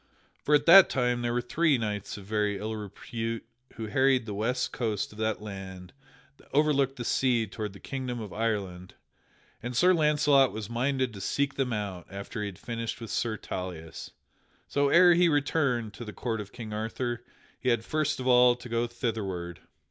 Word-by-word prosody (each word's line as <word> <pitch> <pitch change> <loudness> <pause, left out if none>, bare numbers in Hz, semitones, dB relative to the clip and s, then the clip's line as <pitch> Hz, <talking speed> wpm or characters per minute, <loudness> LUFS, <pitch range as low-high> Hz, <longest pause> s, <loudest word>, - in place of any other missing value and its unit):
For 150 - +4
at 145 - +2
that 190 +3 +9
time 125 -2 0
there 120 0 -1
were 120 +1 0
three 155 +3 +2
knights 105 -4 -3
of 100 - -10
very 105 -1 0
ill 110 +2 -4
repute 115 +2 -5 0.3
who 115 - -5
harried 130 +2 +2
the 105 - -5
west 115 +5 -1
coast 110 -5 -2
of 105 - -13
that 110 -1 -1
land 95 -3 -8 0.4
that - - -22
overlooked 140 -2 +2
the 120 -3 -6
sea 120 -3 +2
toward 105 0 -6
the 100 - -12
Kingdom 130 -3 -4
of 105 -4 -7
Ireland, 100 -5 -3 0.7
and 120 0 -4
Sir 180 +5 +6
Launcelot 150 -4 +4
was 105 +1 -6
minded 130 0 0
to 100 - -8
seek 135 +8 0
them 135 -2 -1
out 100 -5 -4
after 100 +3 -7
he 105 - -2
had 95 -3 -8
finished 115 -1 -5
with 115 -3 -7
Sir 110 -2 -1
Tauleas. 90 -5 -6 0.6
So 140 0 +1
ere 175 +2 +7
he 175 0 +4
returned 140 -7 +1
to 120 - -8
the 105 -2 -8
court 110 +2 -3
of 100 -1 -10
King 110 -3 -7
Arthur 120 +2 -3 0.4
he 130 - 0
had 120 -2 +1
first 155 -2 0
of 130 - -4
all 125 -1 +6
to 125 0 -11
go 115 0 0
thitherward. 100 -8 -4
115 Hz, 190 wpm, -28 LUFS, 105-130 Hz, 0.7 s, that